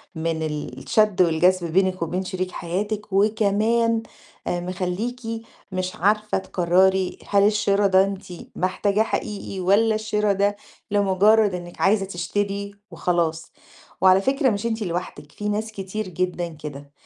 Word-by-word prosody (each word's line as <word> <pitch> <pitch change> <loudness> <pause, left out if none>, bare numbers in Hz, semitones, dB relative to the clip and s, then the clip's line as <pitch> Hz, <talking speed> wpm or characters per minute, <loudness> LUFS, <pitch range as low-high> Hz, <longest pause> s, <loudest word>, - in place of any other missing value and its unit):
من 160 0 -2
الشَد 155 - 0
والجذب 175 0 +3
بينِك 185 0 +2
وبين 180 +3 -1
شريك 185 0 -3
حياتِك 205 +4 -4
وكمان 220 +3 +2 0.4
آآ 175 - 0
مخلّيكِ 185 +7 -3 0.5
مش 185 +1 -3
عارفة 210 +2 +1
تقرّري 185 +1 +2
هل 200 -1 +4
الشِرا 205 -1 +3
ده 190 0 +5
أنتِ 195 -1 -4 0.3
محتاجاه 200 +3 +1
حقيقي 205 -3 -4
والّا 205 +4 +3
الشِرا 210 -1 0
ده 200 +1 +1 0.4
لمُجرّد 205 +1 +4
إنِّك 175 -1 -7
عايزة 195 0 +3
تشتري 200 +2 -3 0.2
وخلاص، 165 -2 -1 0.5
وعلى 185 0 +6
فكرة 270 +3 +2
مش 205 +1 -2
أنتِ 225 -1 -1
لوحدِك، 175 -5 -5
في 210 +5 -4
ناس 215 +2 -2
كتير 200 0 -5
جدًا 180 0 -2
كده، 145 -3 -9
195 Hz, 130 wpm, -23 LUFS, 180-210 Hz, 0.5 s, وعلى